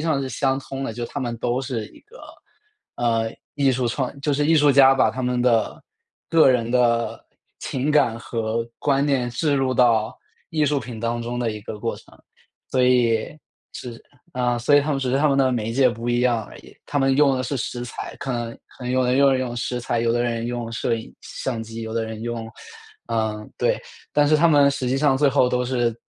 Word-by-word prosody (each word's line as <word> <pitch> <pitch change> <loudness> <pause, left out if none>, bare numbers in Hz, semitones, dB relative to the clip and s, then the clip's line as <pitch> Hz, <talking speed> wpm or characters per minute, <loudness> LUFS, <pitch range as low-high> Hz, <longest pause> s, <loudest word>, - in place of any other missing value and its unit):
上 155 -3 0
是 130 - -3
相 135 +2 0
通 135 0 -6
的。 115 - -3
就 120 +1 -4
它 145 - -5
们 120 -2 -3
都 120 +2 -1
是 125 -5 -4
一 - - -18
个， 460 +4 -18 0.8
呃， 115 -2 0 0.2
艺 140 -2 +2
术 125 -1 -1
创 130 +3 -3
就 145 +1 0
是 145 +1 +1
艺 165 - +4
术 145 -1 +5
家 135 0 +7
把 135 - +3
他 130 - -6
们 125 0 0
的 115 -3 +1 0.5
个 160 -4 +6
人 120 -2 0
的 120 -2 +1 0.3
情 135 +3 -2
感 140 -7 +3
和 115 -1 -2
观 140 0 +1
念 130 -4 +1
置 145 +4 0
入 130 -1 +1
到 115 -3 +3 0.3
艺 155 -2 +1
术 145 0 +1
品 115 -2 -8
当 120 +1 -1
中 120 +1 -4
的 115 - 0
一 105 -1 -6
个 105 - -7
过 115 - -2
程。 - - -18 0.5
所 130 - +2
以， 125 0 +2 0.4
是 120 -2 -8 0.3
啊， 125 -1 0
所 145 +5 +4
以 145 - +6
他 150 - -2
们 140 - 0
只 130 -2 -1
是 135 - +2
他 150 - +3
们 135 - +2
的 130 -1 +3
媒 115 -2 -2
介 130 +1 +4
不 115 0 -5
一 120 0 +1
样 120 -3 +1
而 - - -13
已， - - -16
他 145 - -1
们 135 0 +2
用 140 -2 +4
的 130 - -1
是 135 +3 -3
食 120 0 -4
材， 125 - -7
可 135 - -4
能 120 -1 -3 0.2
可 125 - -10
能 125 - -2
有 130 0 +2
的 - - 0
人 130 - +2
用 135 -2 +4
用 125 -2 -3
食 125 +1 -2
材， 120 0 -1
有 115 0 +1
的 120 0 +1
人 115 -1 -2
用 120 -1 -4
摄 115 +1 0
影 115 0 -7
相 120 -4 -4
机， 115 +1 -8
有 110 0 -5
的 115 -1 0
人 110 -1 -7
用 115 -1 -4 0.6
呃， 110 -2 -1
对， - - +1 0.3
但 145 0 +3
是 155 - +5
他 170 +3 +4
们 145 -2 +5
实 140 -2 -3
际 130 +2 0
上 140 -2 +3
最 140 0 +3
后 130 -2 +3
都 125 0 0
是， 120 -2 0
125 Hz, 250 characters per minute, -22 LUFS, 115-135 Hz, 0.8 s, 家